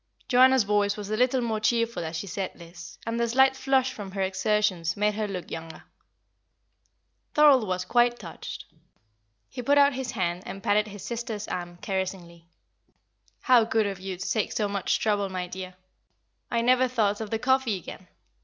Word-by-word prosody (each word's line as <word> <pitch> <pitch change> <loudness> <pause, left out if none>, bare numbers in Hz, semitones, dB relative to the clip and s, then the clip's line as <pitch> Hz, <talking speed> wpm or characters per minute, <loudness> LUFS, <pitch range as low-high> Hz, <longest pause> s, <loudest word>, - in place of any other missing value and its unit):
Joanna's 260 -1 +5
voice 205 0 +1
was 210 0 -6
a - - +1
little 250 +2 +2
more 225 -2 -1
cheerful 230 -1 0
as 160 +1 -5
she 165 - -4
said 195 0 -4
this, 170 -1 -12
and 230 +1 -2
the 235 - +1
slight 265 +2 +4
flush 265 -1 +1
from 205 -3 -7
her 195 - -2
exertions 190 -3 0
made 210 +1 +2
her 215 0 -2
look 185 -3 -6
younger. 165 0 -7 1.5
Thorold 285 -7 +6
was 185 0 -2
quite 240 +3 +3
touched; 175 -7 -8 0.8
he 250 - -7
put 285 +4 +3
out 285 0 +5
his 255 -1 -4
hand 180 -4 -1
and 195 0 -7
patted 210 +1 +2
his 205 -2 -9
sister's 230 -3 -4
arm 175 -1 -5
caressingly. 180 -3 -4 0.9
"How 250 -3 +5
good 220 -1 +1
of 195 -2 -4
you 190 -1 -5
to 195 - -5
take 215 -3 0
so 210 - 0
much 200 -2 0
trouble, 205 -2 0
my 185 -1 -3
dear! 185 0 -8 0.7
I 235 - 0
never 255 +2 +4
thought 220 -4 0
of 220 - -5
the 225 - -1
coffee 255 -3 +1
again. 180 +1 -10
210 Hz, 180 wpm, -26 LUFS, 185-240 Hz, 1.5 s, Thorold